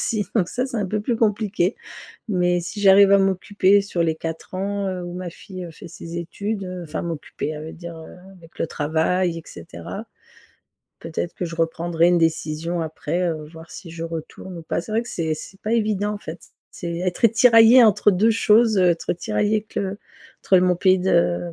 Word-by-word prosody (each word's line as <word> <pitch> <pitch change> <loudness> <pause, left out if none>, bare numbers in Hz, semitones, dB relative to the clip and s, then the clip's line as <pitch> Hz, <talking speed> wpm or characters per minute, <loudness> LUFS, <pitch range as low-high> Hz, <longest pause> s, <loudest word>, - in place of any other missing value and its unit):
aussi. 215 -3 0
Donc 185 -5 +2
ça 250 - -2
c'est 260 -2 -5
un 205 -3 -1
peu 210 +3 -2
plus 230 +3 -1
compliqué 210 -3 +1 0.5
mais 180 -3 +1
si 180 +4 -6
j'arrive 195 0 +7
à 200 - +7
m'occuper 195 +1 +3
sur 190 -3 -2
les 160 -1 +1
4 165 +2 -6
ans, 200 +1 -2
heu, 185 -1 -4
où 175 - -6
ma 180 -1 -5
fille 185 +1 -9
fait 160 - -11
ses 170 0 -9
études, 200 +4 -4
heu, 180 -1 -6
enfin 155 - -5
m'occuper, 165 -3 -5
ça 150 - -7
veut 155 +1 -7
dire 170 -1 -9 0.4
avec 165 -1 -18
le - - +1
travail 165 +3 0
et - - -10
cetera, 85 0 -9 0.9
peut-être 165 +1 -4
que 180 - -3
je 165 -1 -6
reprendrai 165 +1 +1
une 175 - +4
décision 165 +1 -1
après, 160 +2 -3
heu, 155 -2 -4
voir 165 0 -12
si 165 -4 -10
je 165 0 -6
retourne 165 +2 -7
ou - - -9
pas. 160 - -2
C'est 215 - -10
vrai 225 +2 +1
que - - -9
c'est 160 -2 -2
c'est 195 +5 -11
pas 215 - -3
évident 210 -2 0
en 210 - -5
fait. 165 -3 -8 0.3
C'est 170 -1 -5
être 185 +5 +2
tiraillée 230 +2 +7
entre 210 -1 +4
2 210 +5 +3
choses, 220 0 +4
heu, 180 -1 +5
être 165 - -2
tiraillée 190 - 0
que 200 -2 -4 0.5
entre 190 - +5
mon 180 0 +2
pays 185 +1 +3
de 90 - +2
180 Hz, 200 wpm, -22 LUFS, 165-205 Hz, 0.9 s, j'arrive